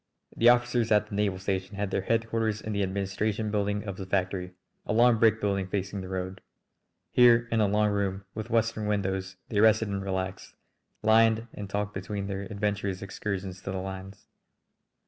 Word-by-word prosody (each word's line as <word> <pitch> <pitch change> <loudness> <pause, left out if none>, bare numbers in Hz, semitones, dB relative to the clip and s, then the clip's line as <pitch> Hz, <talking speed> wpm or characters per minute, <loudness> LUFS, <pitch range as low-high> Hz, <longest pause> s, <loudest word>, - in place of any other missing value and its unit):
The 120 - +6
officers 120 -1 +2
at 105 -1 +4
the - - -9
naval 100 -2 +1
air - - -8
station 95 0 -2
had 100 -1 -2
their - - 0
headquarters 115 0 0
in 110 - -5
the 100 - 0
administration 100 +3 -1
building 105 0 0
of 100 -3 -6
the 95 - -6
factory, 95 -1 -1 0.3
a - - -2
long 120 0 +5
brick 110 -1 +4
building 100 -2 0
facing 95 0 -3
the 95 - -7
road. 95 0 -4 0.7
Here 120 -1 +6
in 115 -1 +2
a 105 - +4
long 105 +1 +2
room 100 -1 -1
with 110 +1 -6
western 115 -2 +1
windows 95 -2 -1
they 105 - 0
rested 110 0 +4
and 100 -1 -2
relaxed, 95 -1 -4 0.5
lined 110 +1 +4
and 100 -1 -7
talked 105 0 -2
between 100 +1 -4
their 100 0 -3
adventurous 100 -2 -2
excursions 95 -1 -4
to 95 - -5
the 95 - -3
lines. 95 +1 -7
100 Hz, 185 wpm, -28 LUFS, 95-110 Hz, 0.7 s, The